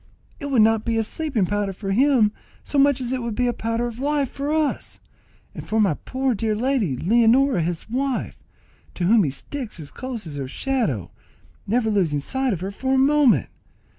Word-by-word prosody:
It 285 - -5
would 255 -6 +4
not 220 0 +3
be 230 -1 -1
a 225 - +2
sleeping 275 - -1
powder 205 +1 -1
for 195 +1 -5
him 245 -1 +4 0.3
so 285 - 0
much 280 -1 +4
as 250 -1 -3
it 255 - -2
would 235 -2 -3
be 250 - +1
a 245 - +1
powder 230 +1 -2
of 240 0 -6
life 285 -1 0
for 280 +2 -3
all 310 -2 +2
of - - -5
us, - - -8 0.5
and - - -9
for 220 - +1
my 200 -7 +3
poor 260 - -2
dear 215 0 -1
lady, 230 - 0
Leonora 235 - +3
his 165 0 -3
wife, 260 +3 -2 0.5
to 180 - -3
whom 210 +4 +5
he 150 - 0
sticks 225 - -6
as 145 -3 -8
close 255 -6 -6
as 150 -3 -7
her 135 -2 -4
shadow, 155 - -2 0.6
never 220 +1 +1
losing 170 -8 +1
sight 265 - -1
of 180 -5 -3
her 190 +2 -3
for 265 +6 -1
a - - +3
moment. 280 -1 +4
230 Hz, 210 wpm, -23 LUFS, 200-265 Hz, 0.6 s, whom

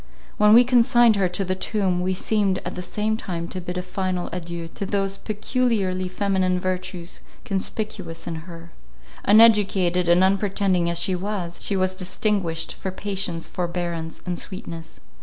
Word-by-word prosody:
When 210 0 +6
we 240 +2 +9
consigned 240 -2 +5
her 190 -2 +2
to 190 +2 -1
the 185 - 0
tomb, 185 -1 0
we 185 +1 0
seemed 200 -1 +1
at - - -4
the 180 - -5
same 210 +4 -1
time 170 -5 -4
to 185 - -5
bid 180 +1 -5
a 180 - -2
final 185 -1 -3
adieu 170 -1 -5
to 200 - -6
those 195 0 -1
peculiarly 210 -4 -1
feminine 185 -1 0
virtues 180 -1 -4 0.2
conspicuous 190 -3 -3
in 170 - -4 0.2
her; 170 0 -11 0.5
uneducated 200 -5 +5
and 175 +2 +5
unpretending 190 -2 +2
as 170 - 0
she 190 +2 0
was, 180 -2 -4
she 200 - -1
was 185 0 +1
distinguished 185 -2 -1
for 190 - -5
patience, 190 -3 -3
forbearance, 170 -2 -4
and 180 -1 -2
sweetness. 165 -4 -7
185 Hz, 160 wpm, -23 LUFS, 175-205 Hz, 0.5 s, we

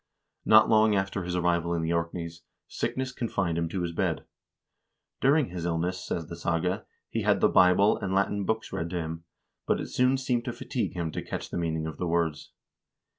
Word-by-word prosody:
Not 110 0 +7
long 110 -1 +4
after 95 0 -1
his 90 0 -3
arrival 85 -1 +1
in 80 - -1
the 80 +1 0
Orkneys, 85 0 -3 0.3
sickness 130 -1 -2
confined 100 -9 -1
him 85 -1 -1
to 90 0 -2
his 85 - -2
bed. 80 - -1 0.9
"During 140 - +3
his 90 -1 -5
illness," 85 +2 -1
says 85 - -3
the 85 - -8
saga, 85 +2 -1 0.2
"he - - -2
had - - +3
the - - +5
Bible 90 +3 +5
and 95 - -3
Latin 100 +1 +1
books 110 +3 -2
read 85 +1 -2
to 90 - -5
him; 80 -1 -4 0.4
but - - +2
it - - -5
soon 125 +1 +3
seemed 125 -3 -1
to - - -3
fatigue - - -3
him 85 -2 -2
to - - -4
catch - - -6
the - - -3
meaning 80 -2 -1
of 80 - -5
the 90 - -2
words. 85 -2 -1
90 Hz, 200 wpm, -28 LUFS, 85-100 Hz, 0.9 s, Not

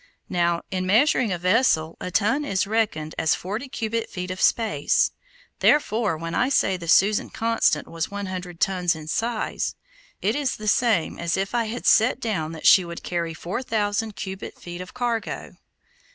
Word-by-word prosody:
Now, 170 -1 +1
in 185 -1 -2
measuring 230 +1 +3
a 180 - 0
vessel, 180 -4 +2
a - - -3
ton 220 - +1
is 195 -10 0
reckoned 200 -8 -1
as 160 -1 +3
forty 215 +9 -5
cubic 230 -3 -3
feet 180 -1 -5
of 185 - -5
space, 160 -12 +2 0.5
therefore 220 - +2
when 165 +1 -5
I 250 - +2
say 195 -8 +2
the 170 -2 -7
Susan 205 +5 +4
Constant 230 0 +1
was 165 -1 -3
one 205 0 -4
hundred 180 -2 -6
tons 180 -3 +1
in 155 -1 -9
size, 225 +6 -2 0.4
it 210 +5 0
is 285 -2 0
the 215 - -7
same 215 -5 +2
as 170 +1 -1
if 195 +3 -2
I 235 -1 +1
had 230 +3 -5
set 235 +3 +4
down 185 -10 -2
that 160 - -9
she 190 - +8
would 170 -1 -8
carry 170 -2 -2
four 180 +9 -4
thousand 215 -2 -1
cubic 190 -1 -7
feet 175 0 -7
of 180 - -10
cargo. 240 -2 -3
195 Hz, 180 wpm, -24 LUFS, 175-225 Hz, 0.5 s, she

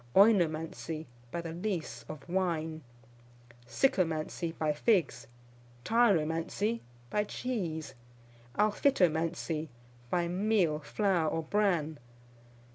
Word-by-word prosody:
Oinomancy, 165 -5 +3 0.2
by 170 - -3
the 165 -1 -6
lees 170 - -3
of 155 0 -8
wine. 165 -3 -1 0.9
Sycomancy, 165 - +1
by 155 -1 +1
figs. 150 - +1 0.6
Tyromancy, 205 0 +2 0.3
by 210 - +2
cheese. 190 -9 -3 0.6
Alphitomancy, 170 - +2 0.4
by 175 +3 +1
meal, 180 -4 +2
flour, 165 +2 +1
or 165 - -2
bran. 165 -5 +1
170 Hz, 85 wpm, -31 LUFS, 155-205 Hz, 0.9 s, Oinomancy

